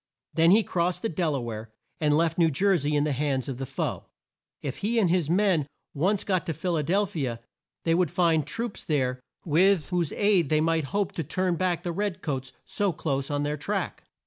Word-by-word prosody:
Then 165 +2 +4
he 215 +4 +6
crossed 180 +1 -1
the 225 - +1
Del 160 -3 0
a - - -1
ware, 115 -2 -6 0.3
and 150 -1 +3
left 165 +1 +1
New 165 -1 +5
Jer 190 +7 +2
sey 150 -2 0
in 145 -1 +3
the 150 - 0
hands 135 -1 -1
of 135 -2 -5
the 135 - -4
foe. - - -3 0.6
If 135 -2 -4
he 220 +4 -1
and 190 -7 +3
his 175 -4 +1
men 180 -5 +2 0.3
once 190 +7 +1
got 185 -3 0
to 165 - 0
Phil 170 +3 -2
a 155 - +1
del 190 +8 +2
phi 160 -7 -3
a, 115 -1 -4 0.4
they 165 - +2
would 175 -1 +2
find 160 -4 +2
troops 230 +2 -4
there 130 -4 0 0.3
with 175 +1 +3
whose 175 -4 0
aid 200 -7 +3
they 155 - +3
might 160 -1 +1
hope 200 +7 -1
to 165 - -3
turn 180 +4 0
back 175 0 0
the 175 - -2
red 200 +1 -2
coats 135 -3 -3
so 200 -2 0
close 140 -5 -2
on 145 0 -1
their 150 +1 -1
track. 145 - -3
165 Hz, 225 wpm, -27 LUFS, 145-185 Hz, 0.6 s, he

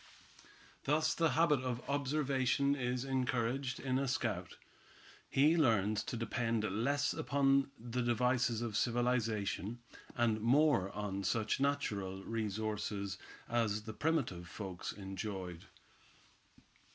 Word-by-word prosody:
Thus 155 +2 +2
the 165 -2 +2
habit 160 -4 +4
of 125 -1 -4
observation 140 -1 +1
is 125 -1 -1
encouraged 130 0 -1
in 130 -1 0
a 140 - 0
scout. 110 -9 -2 0.7
He 150 +5 +4
learns 110 - +3
to 120 - -3
depend 115 0 -1
less 125 +8 +1
upon 140 -1 +2
the 120 +2 -3
devices 120 -1 +1
of 115 -3 -3
civilization, 115 -3 0 0.4
and 115 -3 +1
more 125 -4 +4
on 100 -2 -3
such 110 +4 0
natural 105 -9 -1
resources 105 -3 -3 0.3
as 110 -3 0
the 110 0 -6
primitive 120 - -1
folks 95 -4 -5
enjoyed. 95 -2 -6
120 Hz, 110 wpm, -35 LUFS, 105-135 Hz, 0.7 s, habit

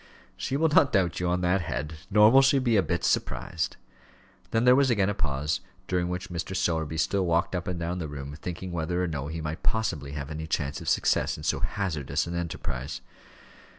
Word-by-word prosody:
"She 135 - -2
will 160 +2 +3
not 145 -2 +5
doubt 90 -6 +1
you, 90 - 0
on 90 +1 +1
that 90 +2 +2
head; 75 -1 -3 0.2
nor 105 +1 +7
will 135 +2 +8
she 135 +1 +4
be 125 -4 +2
a 100 - +5
bit 85 -2 -2
surprised." 85 - -1 0.7
Then 115 0 +1
there 125 0 +8
was 140 0 +4
again 100 -5 +2
a - - 0
pause, 75 -2 -1 0.3
during 90 -1 0
which 90 +1 -4
Mr. 90 +2 -4
Sowerby 80 -3 0
still 95 +3 +1
walked 85 +3 +1
up 90 - -3
and 90 -2 -2
down 85 +2 -2
the 80 - -3
room, 70 0 -6
thinking 90 +1 -5
whether 85 +2 -1
or - - 0
no 70 -4 -3
he 80 +2 -4
might 75 +1 -4
possibly 80 -11 -1
have 70 0 -5
any 80 +1 -5
chance 70 -3 -2
of - - -2
success - - +2
in - - -9
so - - +1
hazardous 85 -9 -1
an 85 - -5
enterprise. 80 -6 -4
85 Hz, 215 wpm, -27 LUFS, 80-95 Hz, 0.7 s, will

